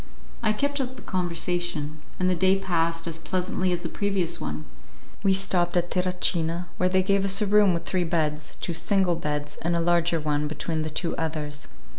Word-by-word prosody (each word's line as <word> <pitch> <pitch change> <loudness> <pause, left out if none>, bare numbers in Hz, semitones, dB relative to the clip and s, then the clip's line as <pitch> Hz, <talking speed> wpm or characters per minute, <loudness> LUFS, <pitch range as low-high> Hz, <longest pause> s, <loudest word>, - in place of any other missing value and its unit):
I 215 -2 +2
kept 285 +6 -1
up 260 0 -4
the 250 - -12
conversation, 175 -4 -2 0.2
and 185 - +2
the 185 - +3
day 190 +2 +3
passed 165 -3 0
as 165 -1 -3
pleasantly 185 +2 -1
as 175 0 -2
the - - -1
previous 190 -2 -1
one. 75 +1 -4 0.6
We 200 -1 +3
stopped 185 -2 +2
at 175 0 0
Terracina, 180 -2 +2
where 180 - +2
they 185 0 +3
gave 195 +1 +2
us 195 +1 +4
a 210 - +1
room 205 -1 +5
with 170 -1 -2
three 185 -1 0
beds, 155 -3 -1
two 170 - -2
single 185 +1 +2
beds 150 -1 -3
and 170 +1 0
a - - +1
large 170 0 +2
one 150 -2 0
between 155 +1 -3
the 155 - -2
two 165 +2 -2
others. 150 -2 -3
175 Hz, 195 wpm, -26 LUFS, 160-190 Hz, 0.6 s, room